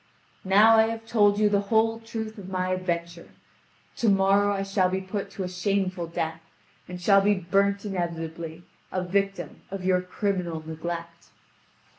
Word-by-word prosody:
Now 210 +4 +6
I 220 0 +5
have 225 0 -5
told 205 -3 +3
you 210 0 +4
the 205 -1 +2
whole 225 0 +2
truth 220 -1 -6
of 190 -1 -9
my 185 -1 -1
adventure. 170 -2 -3 0.7
To 230 - +2
morrow 200 +1 +4
I 195 -1 -1
shall 195 -2 +1
be 190 +1 -1
put 190 +2 -5
to 195 - -4
a - - -3
shameful 185 -1 -1
death, 160 0 -3 0.5
and 180 0 -7
shall 195 +2 +5
be 205 +1 +3
burnt 200 +2 +1
inevitably, 170 -3 -4 0.3
a 185 - -1
victim 195 +2 -2
of 195 -1 -6
your 185 -1 +3
criminal 180 -3 -2
neglect." 170 +1 -6
190 Hz, 160 wpm, -26 LUFS, 175-205 Hz, 0.7 s, Now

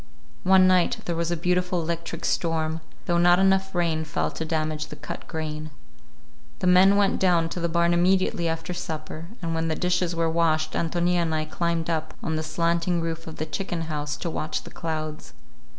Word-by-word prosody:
One 190 +3 +6
night 185 -1 +3
there 170 - -1
was 170 0 -1
a 175 - 0
beautiful 180 +1 +1
electric 170 0 -4
storm, 160 -1 0 0.2
though 175 -1 +2
not 175 0 +6
enough 190 0 +2
rain 165 -2 +1
fell 155 - -2
to - - -4
damage 155 -1 -2
the - - -9
cut - - -8
grain. 155 -1 -4 0.9
The 125 - -4
men 185 +2 +6
went 200 -1 +2
down 175 -3 +3
to 175 - -4
the 170 0 0
barn 170 +1 +2
immediately 180 -1 +2
after 165 +2 -3
supper, 160 -1 -6 0.2
and 165 0 -1
when 165 0 0
the 160 - 0
dishes 180 0 0
were 165 0 +1
washed 160 -1 +1
Ántonia 175 +1 +1
and 160 -2 0
I 155 0 -1
climbed 170 +1 -1
up 160 -2 -2
on 160 - -1
the 155 - 0
slanting 170 +2 0
roof 165 0 -4
of 160 - -7
the 155 - -3
chicken 175 +1 -3
house 150 -2 -3
to 170 - -3
watch 155 - -3
the - - -11
clouds. 155 -6 -5
165 Hz, 195 wpm, -25 LUFS, 160-175 Hz, 0.9 s, One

